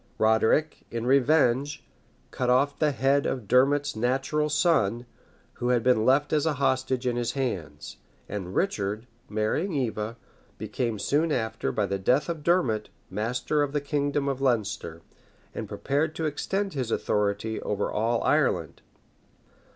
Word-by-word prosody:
Roderic, 110 +8 +2
in 115 0 -4
revenge, 140 +1 +2 0.5
cut 125 -1 -1
off 140 +3 +2
the 155 - +3
head 135 +2 +2
of 125 -6 -3
Dermot's 140 +4 +3
natural 135 +6 0
son, 125 - +2 0.6
who 120 - +1
had 120 -2 +2
been 125 -3 +3
left 140 +4 +3
as 155 +1 +2
a 160 - +2
hostage 130 -1 0
in 120 -1 0
his 120 -1 -1
hands; 90 - -4 0.3
and 95 -2 -5
Richard, 110 - -1 0.2
marrying 110 - -1
Eva, 115 -4 -2 0.4
became 115 -4 -2
soon 150 +9 +1
after, 110 -4 -1
by 105 - 0
the 100 0 -2
death 130 - +2
of 165 -3 -3
Dermot, 130 -12 +1 0.2
master 120 +8 -1
of 145 -1 -1
the 145 - +1
kingdom 145 0 -1
of 135 -1 -2
Leinster, 105 -10 -1 0.5
and - - -6
prepared 155 +3 -1
to 160 - -2
extend 195 +6 -2
his 130 -5 -2
authority 105 0 -1
over 105 0 -2
all 115 +2 0
Ireland. - - +1
125 Hz, 145 wpm, -27 LUFS, 110-145 Hz, 0.6 s, the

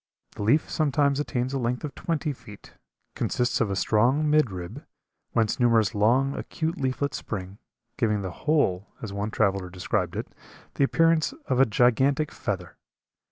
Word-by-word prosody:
The - - -9
leaf 120 +10 +3
sometimes 145 -2 +1
attains 130 -3 -2
a 135 - 0
length 120 0 -2
of 150 -3 -4
twenty 155 -3 -2
feet, 115 -5 -14 0.4
consists 125 0 0
of 110 - +1
a 100 - -1
strong 125 +10 +2
mid 150 -4 +4
rib, 90 -2 -7 0.5
whence 110 0 +1
numerous 115 -3 +3
long, 120 +6 +3
acute 160 0 -3
leaflets 135 +2 -1
spring, 95 -1 -6 0.4
giving 105 -4 +1
the 95 - -4
whole, 105 - 0 0.2
as 105 -3 -5
one 100 +1 -2
traveler 100 -4 0
described 90 0 -2
it, - - -5 0.4
the - - +1
appearance 165 - +3
of 130 - 0
a 135 - +6
gigantic 130 +7 +2
feather. 90 -5 -4
120 Hz, 160 wpm, -26 LUFS, 105-140 Hz, 0.5 s, a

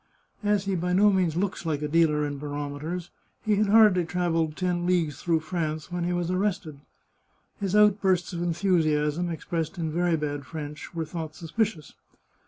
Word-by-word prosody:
As 205 -2 +1
he 195 - -1
by 180 +1 -1
no 205 +3 +5
means 180 -5 +1
looks 190 -1 -1
like 155 -3 -2
a - - 0
dealer 150 -1 +3
in 145 -1 -4
barometers, 145 +4 -5 0.3
he 210 -2 +2
had 210 0 +2
hardly 210 -4 +6
trav 175 +1 -1
elled 160 -2 0
ten 180 -2 0
leagues 165 -7 0
through 165 -2 +1
France 160 -2 -3
when 175 -1 -2
he 175 - 0
was 175 0 -1
arrested. 185 -6 -1 0.8
His 195 0 -1
outbursts 195 -4 +3
of 170 - -3
enthusiasm, 170 -2 +1
expressed 165 +1 -3
in 160 -2 -2
very 175 +1 +1
bad 145 -2 -3
French, 150 +2 -8
were 165 -1 -2
thought 160 -1 -6
suspicious. 170 -1 -2
170 Hz, 175 wpm, -26 LUFS, 155-185 Hz, 0.8 s, hardly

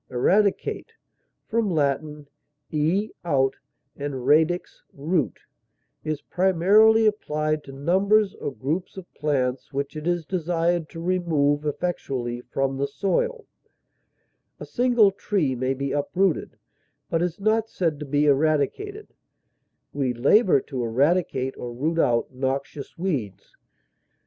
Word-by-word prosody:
Eradicate 200 - +1 0.6
(L. 150 -8 0 0.5
e, 165 +8 +1
out, 135 -5 +1 0.4
and 140 -3 -5
radix, 160 +5 +2
root) 155 +1 -1 0.7
is 155 -2 -3
primarily 195 +5 +4
applied 155 -7 0
to 135 - -11
numbers 195 +8 +2
or - - -5
groups 155 +9 -3
of 190 - -7
plants 135 -4 -1
which 140 +2 -3
it 155 +2 -5
is 175 -2 0
desired 170 -1 0
to 165 - -9
remove 160 -5 +1
effectually 135 -7 -3
from 135 +1 -2
the 140 +1 0
soil; 445 - -1 1.1
a - - -7
single 240 -5 +3
tree 195 -7 -1
may 130 +1 -1
be 140 +1 -3
uprooted, 170 +5 0 0.5
but 165 - +1
is 175 0 -2
not 220 +2 +1
said 165 -5 -1
to 150 - -5
be 145 +2 +2
eradicated; 155 - 0 0.8
we 130 -4 -1
labor 170 - +4
to 130 -2 -5
eradicate 135 +2 +1
or 120 - -6
root 160 +6 -1
out 120 -4 +1
noxious 135 +2 -4
weeds. 140 - -4
155 Hz, 120 wpm, -24 LUFS, 140-185 Hz, 1.1 s, primarily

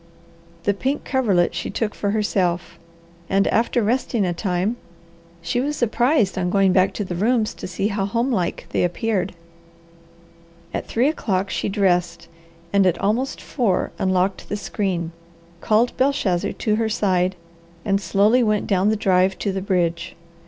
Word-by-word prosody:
The 205 - +2
pink 265 +8 -2
coverlet 210 -10 +2
she - - -4
took 220 -3 -2
for 205 - -2
herself, 190 -4 -1 0.5
and 195 +1 +3
after 235 +1 +1
resting 235 -1 0
a 175 - 0
time 185 +5 -1 0.7
she 240 +9 0
was 295 +3 -1
surprised 240 -3 +1
on 180 -1 0
going 195 0 +3
back 185 0 +4
to 210 - -2
the 185 - -5
rooms 215 +4 +1
to - - -7
see 190 +3 -1
how 200 -2 -1
homelike 230 -4 -1
they - - +1
appeared. 190 +1 -1 1.4
At - - -3
three 240 +4 +2
o'clock 195 - -1
she - - -1
dressed 180 -4 0 0.5
and 200 -1 +4
at 180 - +2
almost 235 +7 0
four 230 -9 -1
unlocked 185 0 0
the 205 - -2
screen, 185 -5 -2 0.5
called 220 +5 +2
Belshazzar 205 -9 +1
to 215 -2 0
her 225 -1 0
side, 185 -4 +1 0.5
and 195 -1 +1
slowly 205 +7 +3
went 215 -3 +1
down 195 0 +2
the 220 - +2
drive 190 -2 +2
to 200 - -1
the 190 0 -3
bridge. 175 -3 -1
200 Hz, 155 wpm, -22 LUFS, 185-225 Hz, 1.4 s, back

